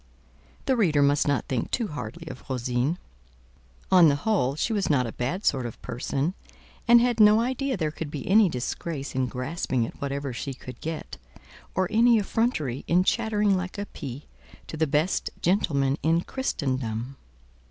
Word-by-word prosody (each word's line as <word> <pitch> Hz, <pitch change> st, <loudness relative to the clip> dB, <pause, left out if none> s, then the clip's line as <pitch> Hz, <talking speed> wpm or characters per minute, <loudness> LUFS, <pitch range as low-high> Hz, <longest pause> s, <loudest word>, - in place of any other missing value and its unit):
The 265 Hz, -, +2 dB
reader 160 Hz, -, +3 dB
must 145 Hz, +1 st, +3 dB
not 145 Hz, -, +1 dB
think 125 Hz, -3 st, -2 dB
too 230 Hz, -4 st, -1 dB
hardly 165 Hz, +2 st, -7 dB
of 130 Hz, -, -10 dB
Rosine; 125 Hz, +5 st, -1 dB, 0.9 s
on 180 Hz, -3 st, +8 dB
the 140 Hz, -, +2 dB
whole, 145 Hz, -, 0 dB
she 225 Hz, +9 st, -1 dB
was 205 Hz, -2 st, 0 dB
not 135 Hz, -4 st, +3 dB
a 115 Hz, -, -4 dB
bad 170 Hz, -, -3 dB
sort 130 Hz, -3 st, +1 dB
of 115 Hz, -, -10 dB
person, 135 Hz, +7 st, -2 dB, 0.5 s
and 235 Hz, 0 st, +8 dB
had 240 Hz, -1 st, +1 dB
no 210 Hz, 0 st, +7 dB
idea 260 Hz, +1 st, -1 dB
there 155 Hz, -4 st, -1 dB
could 155 Hz, 0 st, -6 dB
be 145 Hz, -2 st, -6 dB
any 205 Hz, 0 st, +5 dB
disgrace 140 Hz, +2 st, -4 dB
in 130 Hz, -1 st, 0 dB
grasping 130 Hz, -1 st, -2 dB
at -, -, -10 dB
whatever 140 Hz, -1 st, -3 dB
she 135 Hz, +2 st, -5 dB
could 125 Hz, -1 st, -11 dB
get, 160 Hz, 0 st, -5 dB, 0.6 s
or 185 Hz, -1 st, +2 dB
any 235 Hz, +1 st, +5 dB
effrontery 195 Hz, -, -1 dB
in 180 Hz, +2 st, +4 dB
chattering 210 Hz, -2 st, +2 dB
like 185 Hz, +1 st, -4 dB
a 205 Hz, -, -3 dB
pie 135 Hz, -6 st, -8 dB, 0.4 s
to -, -, -7 dB
the 160 Hz, 0 st, +1 dB
best 150 Hz, +6 st, 0 dB
gentleman 145 Hz, -7 st, +1 dB
in 165 Hz, +2 st, +2 dB
Christendom. 130 Hz, -, -3 dB
155 Hz, 170 wpm, -26 LUFS, 135-205 Hz, 0.9 s, on